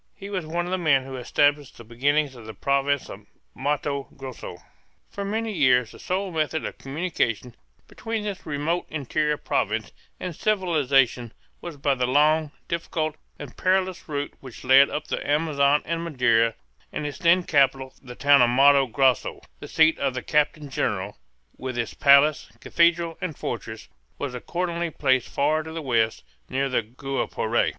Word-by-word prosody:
He 200 0 -9
was 185 -5 -3
one 170 +2 -2
of 180 - -5
the 185 - 0
men 140 -6 +3
who 135 0 -8
established 145 +3 +1
the 120 - -11
beginnings 140 +5 0
of 120 -3 -12
the 110 - -8
province 140 0 0
of - - -11 0.3
Matto 140 0 -2
Grosso. 130 -9 -8 0.5
For 200 - -5
many 220 +2 -2
years 125 - +3
the - - -14
sole 190 +1 -2
method 160 -1 -1
of - - -7
communication 135 - -2 0.3
between 225 -1 -4
this 200 -2 -5
remote 155 +4 -2
interior 150 +1 -1
province - - -2 0.3
and 180 -3 -5
civilization 140 - +1 0.3
was 170 -4 -7
by 140 0 +1
the 125 -2 -1
long, 150 +3 +3 0.2
difficult, 160 -2 -2 0.2
and - - -10
perilous 185 -2 0
route 145 -1 -3
which 130 -4 -11
led 135 +2 +6
up 150 - -4
the - - -3
Amazon 145 -1 +2
and 165 0 -2
Madeira; 115 -7 +2 0.4
and 150 - -4
its 145 -2 -5
then 175 +1 +4
capital, 135 -4 +2
the 125 -2 -10
town 140 0 +5
of 120 - +5
Matto 135 +2 +5
Grosso, 130 +1 +1 0.2
the - - -9
seat 160 0 +3
of 135 -2 -1
the 130 - -4
captain 150 -1 0
general, 100 -4 -2 0.4
with 130 -2 -5
its 115 -2 -2
palace, 140 +1 +4
cathedral, 170 +1 +1
and 160 -6 -4
fortress, 110 -1 -6 0.3
was 140 -3 -4
accordingly 170 +6 -3
placed 130 -4 +1
far 155 +3 +1
to 160 +1 -9
the 165 - -5
west, 115 -6 0 0.3
near 135 +1 -1
the 125 - +1
Guapore. 120 -1 -1
145 Hz, 165 wpm, -24 LUFS, 130-165 Hz, 0.5 s, led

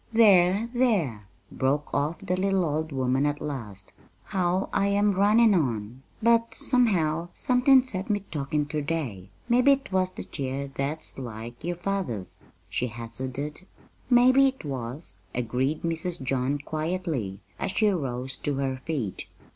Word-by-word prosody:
"There, 200 -1 +5
there," 175 - +1 0.2
broke 140 +3 -1
off 145 +4 0
the 180 - +1
little 190 -1 +1
old 155 +1 -2
woman 130 +1 +1
at 145 0 -1
last, 115 -11 -6 0.3
"how 185 0 0
I 195 0 +2
am 205 0 +3
runnin' 210 +3 +5
on! 120 - -1 0.2
But, 230 0 +3
somehow, 175 - +2
somethin' 255 +1 +5
set 205 -4 -4
me 205 -1 +1
to - - -22
talkin' 145 +2 0
ter 150 +1 -3
day. 140 - -3 0.2
Mebbe't 255 +1 +3
was 185 -1 +1
that - - -8
chair 135 -1 -3
that's 145 +2 -3
like 120 0 -7
yer 175 +1 -2
father's," 175 - -3 0.3
she 110 +7 -1
hazarded. 130 - -6 0.4
"Maybe 255 +2 +6
it 265 -9 -4
was," 130 - -4 0.2
agreed 125 +5 -1
Mrs. 165 -1 -2
John 130 +2 0
quietly, 155 - -3 0.2
as - - -1
she 215 +3 +2
rose 135 -7 -2
to 145 - -2
her 135 -1 -1
feet. 135 - -3
155 Hz, 145 wpm, -27 LUFS, 130-195 Hz, 0.4 s, Maybe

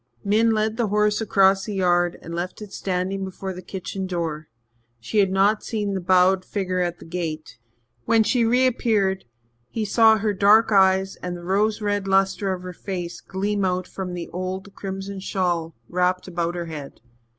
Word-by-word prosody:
Min 220 +3 +3
led 215 0 0
the 235 -3 +1
horse 210 +1 +2
across 195 -2 +3
the 210 - -4
yard 175 -2 +2
and 165 - -7
left 175 +2 -4
it 210 -2 -10
standing 190 +1 -2
before 190 0 -5
the 180 - -8
kitchen 190 0 -5
door; 165 -4 -3 0.5
she 120 - -1
had 195 -2 +4
not 200 +3 +3
seen 210 -3 -2
the 190 - -2
bowed 185 +1 +4
figure 185 -2 -2
at 175 -1 -1
the - - -13
gate. 160 -7 -5 0.5
When 225 -1 +4
she 240 +2 +2
reappeared, 225 - +2 0.4
he 220 -2 -2
saw 220 +1 +5
her 210 0 0
dark 210 +3 +5
eyes 190 -1 +3
and 180 -1 -5
the 175 - -11
rose 210 +4 +1
red 205 -1 -1
lustre 195 0 +2
of 185 -1 -4
her 180 0 -6
face 175 -2 -5
gleam 200 +1 -2
out 185 -1 0
from 190 -1 -6
under 180 - -5
the 175 - -6
old 185 +2 -5
crimson 195 0 -6
shawl 175 -4 -1
wrapped 180 +1 0
about 170 -1 -2
her 175 -1 -3
head. 150 -4 -8
190 Hz, 185 wpm, -23 LUFS, 180-205 Hz, 0.5 s, saw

